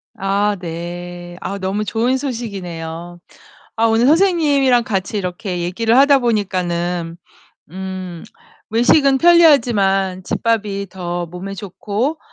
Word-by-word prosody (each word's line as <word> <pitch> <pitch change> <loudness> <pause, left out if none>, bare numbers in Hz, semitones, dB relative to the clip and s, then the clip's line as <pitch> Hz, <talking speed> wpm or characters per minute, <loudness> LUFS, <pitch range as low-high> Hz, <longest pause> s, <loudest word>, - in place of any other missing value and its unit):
아 200 +2 0
네. 175 +1 -7
아 200 - -4
너무 195 +3 -2
좋은 240 +5 0
소식이네요. 175 - -6 0.6
아 225 - +1
오늘 225 +2 +3
선생님이랑 290 -8 +3
같이 195 0 -2
이렇게 180 0 -4
얘기를 225 +7 +1
하다 280 0 +6
보니까는 180 -6 -1 0.6
음 185 -2 -6 0.5
외식은 265 +4 +4
편리하지만 225 - +4
집밥이 205 -3 -1
더 175 -1 -4
몸에 180 +4 -7
좋고 210 - -3
195 Hz, 250 characters per minute, -18 LUFS, 180-240 Hz, 0.6 s, 하다